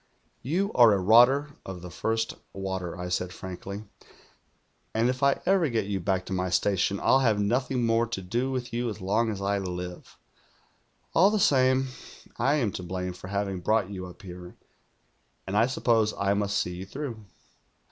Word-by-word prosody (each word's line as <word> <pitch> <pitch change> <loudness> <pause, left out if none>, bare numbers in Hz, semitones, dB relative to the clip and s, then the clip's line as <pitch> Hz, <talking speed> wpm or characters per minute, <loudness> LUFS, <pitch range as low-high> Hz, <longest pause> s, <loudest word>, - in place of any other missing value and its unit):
" - - -41
' - - -42 0.2
You 200 +2 +1
are 120 -3 +7
a - - +3
rotter 125 +9 +5
of 90 -2 -8
the 90 - -8
first 115 +7 -1 0.2
water,' 95 -2 -4
I 90 0 -5
said 90 0 -1
frankly. 95 +3 -7 1.1
'And 115 +2 +3
if 130 +1 -7
I 140 0 +3
ever 185 -4 +3
get 115 -4 0
you 100 -1 -2
back 95 +1 -1
to 95 - -5
my 90 0 -1
station, 100 +1 +1
I'll 135 - +4
have 115 -6 +2
nothing 125 +4 0
more 115 +1 +2
to 115 -4 -4
do 120 +8 -1
with 125 -2 -4
you 120 0 -1
as 105 - -6
long 105 +5 +1
as 100 -2 -4
I 100 0 +1
live. 90 -1 -6 1.0
All 185 +4 +6
the 215 0 +1
same, 130 -4 +3 0.5
I 135 +6 +3
am 120 -9 +1
to - - -6
blame 90 +1 -4
for 90 - -10
having 100 -1 -2
brought 105 +1 +1
you 90 -2 -6
up 90 +3 -13
here, 90 -1 -10 0.9
and 95 - -4
I 115 +3 +4
suppose 115 -4 +1
I 100 0 +1
must 100 0 0
see 90 0 -2
you 95 +1 -7
through.' 125 -3 -6
105 Hz, 190 wpm, -27 LUFS, 95-120 Hz, 1.1 s, are